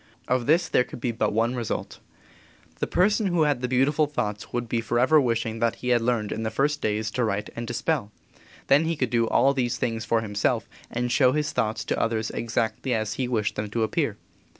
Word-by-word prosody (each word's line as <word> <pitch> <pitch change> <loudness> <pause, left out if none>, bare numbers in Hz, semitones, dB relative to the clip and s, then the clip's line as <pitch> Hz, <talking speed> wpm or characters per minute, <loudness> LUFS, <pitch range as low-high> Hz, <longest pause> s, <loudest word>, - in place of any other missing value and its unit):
Of 125 -2 0
this 165 +3 +4
there 125 - +3
could - - -10
be 120 0 -1
but 110 -2 0
one 115 +3 +1
result. 120 -4 -4 0.8
The - - -1
person 205 +3 +2
who 175 -3 +2
had 145 -4 +1
the 125 - 0
beautiful 135 +5 +2
thoughts 105 -7 -3
would 120 -1 -2
be 115 0 0
forever 125 +7 +3
wishing 115 -2 -1
that 115 0 +1
he 125 - -5
had 120 -1 +4
learned 115 -3 0
in - - -3
the 110 - -1
first 145 +6 0
days 105 0 -1
to 125 - 0
write 105 -2 -2
and 120 0 -5
to 120 - -4
spell. 140 -11 -1 0.5
Then 145 +4 +4
he 165 +1 0
could 130 -5 -1
do 115 -1 +2
all 135 +4 +3
these 125 -2 -1
things 115 -1 -2
for 110 +2 +1
himself 105 -2 -1 0.2
and 120 0 -2
show 130 -1 +4
his 150 0 0
thoughts 110 0 -1
to - - -1
others 110 -1 -1
exactly 115 +2 -1
as 110 -1 -1
he 130 - -2
wished 110 -4 0
them 105 0 -3
to 115 +2 -1
appear. 110 - -1
120 Hz, 220 wpm, -25 LUFS, 110-135 Hz, 0.8 s, this